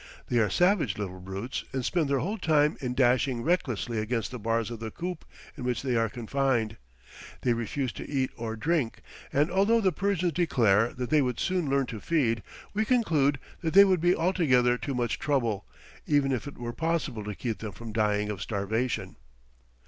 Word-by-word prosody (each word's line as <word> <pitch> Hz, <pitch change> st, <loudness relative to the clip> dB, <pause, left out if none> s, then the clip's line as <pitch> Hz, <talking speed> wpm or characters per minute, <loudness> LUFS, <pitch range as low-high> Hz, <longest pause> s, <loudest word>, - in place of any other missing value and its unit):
They 120 Hz, -, +2 dB
are 105 Hz, -2 st, +3 dB
savage 175 Hz, -, +2 dB
little 95 Hz, -3 st, -5 dB
brutes, 95 Hz, +7 st, -5 dB
and 130 Hz, -2 st, -2 dB
spend 165 Hz, -6 st, +1 dB
their 140 Hz, -, +2 dB
whole 205 Hz, +7 st, -2 dB
time 150 Hz, -3 st, +3 dB
in 125 Hz, -2 st, -2 dB
dashing 125 Hz, -1 st, +2 dB
recklessly 120 Hz, -, 0 dB
against 115 Hz, +1 st, -2 dB
the 125 Hz, -, -6 dB
bars 115 Hz, +1 st, -1 dB
of 115 Hz, -, -6 dB
the 115 Hz, 0 st, -4 dB
coop 175 Hz, +6 st, -5 dB, 0.3 s
in 135 Hz, -, -7 dB
which 125 Hz, -1 st, -1 dB
they 130 Hz, -3 st, 0 dB
are 115 Hz, -1 st, +2 dB
confined. 120 Hz, -1 st, -1 dB, 0.6 s
They 125 Hz, -, +2 dB
refuse 120 Hz, +3 st, -2 dB
to -, -, -8 dB
eat 135 Hz, -2 st, 0 dB
or 115 Hz, -2 st, -4 dB
drink, 140 Hz, 0 st, -1 dB, 0.3 s
and 150 Hz, +4 st, +2 dB
although 200 Hz, +5 st, +4 dB
the 195 Hz, -4 st, +2 dB
Persians 180 Hz, -1 st, 0 dB
declare 120 Hz, -, +3 dB
that 125 Hz, +1 st, -4 dB
they 155 Hz, -1 st, +5 dB
would 125 Hz, -3 st, -1 dB
soon 180 Hz, -6 st, 0 dB
learn 135 Hz, 0 st, +2 dB
to 115 Hz, -3 st, -6 dB
feed, 115 Hz, -7 st, +1 dB, 0.3 s
we 215 Hz, +2 st, +1 dB
conclude 160 Hz, -, +2 dB, 0.2 s
that 165 Hz, 0 st, -2 dB
they 200 Hz, 0 st, +10 dB
would 185 Hz, -4 st, +2 dB
be 175 Hz, +1 st, +4 dB
altogether 145 Hz, -9 st, +3 dB
too 135 Hz, +2 st, -4 dB
much 120 Hz, -2 st, -1 dB
trouble, 120 Hz, -9 st, 0 dB, 0.4 s
even 145 Hz, -2 st, +3 dB
if 130 Hz, +1 st, -2 dB
it 145 Hz, -, -9 dB
were 120 Hz, 0 st, -5 dB
possible 160 Hz, -8 st, -1 dB
to 105 Hz, 0 st, -5 dB
keep 115 Hz, 0 st, -3 dB
them 110 Hz, -2 st, -5 dB
from 115 Hz, +2 st, -9 dB
dying 105 Hz, -1 st, +1 dB
of 100 Hz, -, -6 dB
starvation. 110 Hz, +4 st, -2 dB
130 Hz, 195 wpm, -28 LUFS, 115-160 Hz, 0.6 s, they